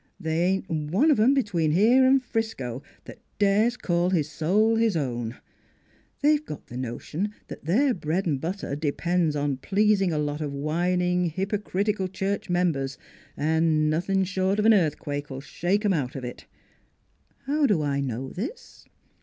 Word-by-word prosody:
They 160 +1 -1
ain't 190 0 0
one 170 - +1
of 275 - +3
'em 250 +6 +5
between 175 - +1
here 230 +9 +5
an' 265 +1 +5
Frisco 220 - -3 0.2
that - - -11 0.2
dares 210 +4 +3
call 175 -3 0
his 165 -6 +1
soul 210 +9 +2
his 225 -6 +2
own. 120 -5 -3 0.9
They've 300 0 +4
got 150 - -8
the 120 - -11
no 120 -2 -4
tion 205 +7 -4
that - - -9
their 250 - +3
bread 170 0 -2
and 145 -6 -1
butter 175 -3 -3
depends 160 +2 0
upon 145 -2 -1
pleasing 200 +3 +2
a 155 - -1
lot 150 0 -2
of 145 -2 -3
whining, 180 +4 0
hypocritical 195 +2 -1
church 195 +1 -3
members, 160 -7 0 0.4
an' 155 0 +2
nothing 190 +4 +1
short 190 +1 0
of 210 - +1
an 225 - +7
earthquake 145 -5 0
'11 135 -1 -6
shake 200 +5 0
'em 200 - +3
out 135 -7 -2
of 135 - -5
it. 125 - -8 1.0
How 290 +1 +2
do 185 -10 +2
I 140 -1 0
know 130 -1 -3
this? 335 - -7
180 Hz, 165 wpm, -26 LUFS, 150-205 Hz, 1.0 s, an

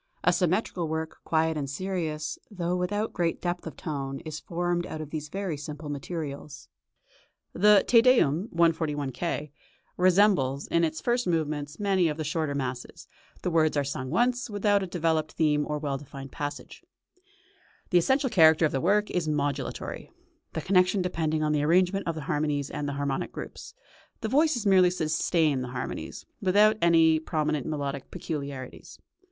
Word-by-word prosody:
A - - +4
symmetrical 180 -1 0
work, 160 0 -4
quiet 160 0 +1
and 140 -3 -3
serious, 160 -1 -3
though 180 -4 -2
without 205 +5 -1
great 170 -2 -1
depth 175 -1 -3
of 160 - -8
tone, 135 -3 -4
is 155 -1 -6
formed 175 0 -2
out 155 - -6
of 155 -1 -7
these 150 -1 -5
very 190 -2 -3
simple 150 +1 -7
materials. 145 -1 -6 0.8
The 210 +1 +5
"Te 230 -2 +7
Deum" 210 - +3
(141 160 -4 +1
K.) 150 0 -3 0.5
resembles 180 -7 +3
in 170 - +1
its 160 -1 -1
first 245 -3 0
movements 155 -3 -2
many 195 -4 +2
of 150 -1 -2
the 155 - -2
shorter 150 -1 -2
masses; 130 -2 -5 0.4
the 180 - 0
words 155 -2 +2
are 145 - +2
sung 135 -1 -4
once, 240 - +1
without 205 -1 +2
a 190 - -3
developed 160 -3 0
theme 150 -2 +1
or 150 - -2
well 140 -2 -3
defined 135 -1 -10
passages. 145 -3 -6 1.1
The 180 - +6
essential 265 +8 +1
character 160 -5 +6
of 155 - +1
the 135 - -1
work 205 +4 +2
is 175 -3 -1
modulatory, 145 -3 -3 0.4
the - - -2
connection 185 0 +3
depending 160 -3 -1
on 150 - +1
the 150 -1 +1
arrangement 180 +5 +2
of 165 - -1
the 155 - -5
harmonies 145 -1 -1
and 145 - -3
the - - -3
harmonic 140 -1 -2
groups; - - -9 0.5
the 220 - -2
voices 280 -3 +2
merely 185 -2 +6
sustain 160 -4 +1
the 125 - -4
harmonies, - - -5 0.2
without 210 +3 +4
any 165 -2 +5
prominent 155 -3 -1
melodic 140 -3 -4
peculiarities. 140 -5 -6
160 Hz, 165 wpm, -27 LUFS, 145-180 Hz, 1.1 s, Te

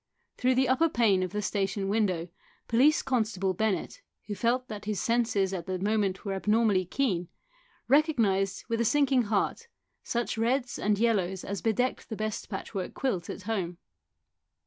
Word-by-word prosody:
Through 255 +1 +2
the 260 +1 +3
upper 305 +7 +3
pane 215 -8 +3
of 185 - -2
the 210 +1 -2
station 195 -1 -1
window 190 -5 0 0.4
Police 270 +7 +4
constable 215 -7 0
Bennett, 220 - -1 0.2
who 210 - -4
felt 240 +5 0
that 210 -2 -7
his 210 -2 -2
senses 225 -5 +1
at 175 -3 -4
the 185 0 -1
moment 200 0 0
were 195 - -1
abnormally 210 -1 +2
keen, 180 -5 -1 0.6
recognised 230 - +2
with 230 0 0
a - - +3
sinking 265 0 +3
heart 215 - -1 0.3
such 235 -1 -2
reds 245 +2 0
and 210 0 +1
yellows 195 -5 +1
as 200 0 -4
bedecked 240 +3 0
the 220 - -3
best 215 0 -4
patchwork 190 -1 -5
quilt 200 -11 -2
at 200 - -6
home. 185 -5 -2
215 Hz, 160 wpm, -28 LUFS, 195-240 Hz, 0.6 s, Police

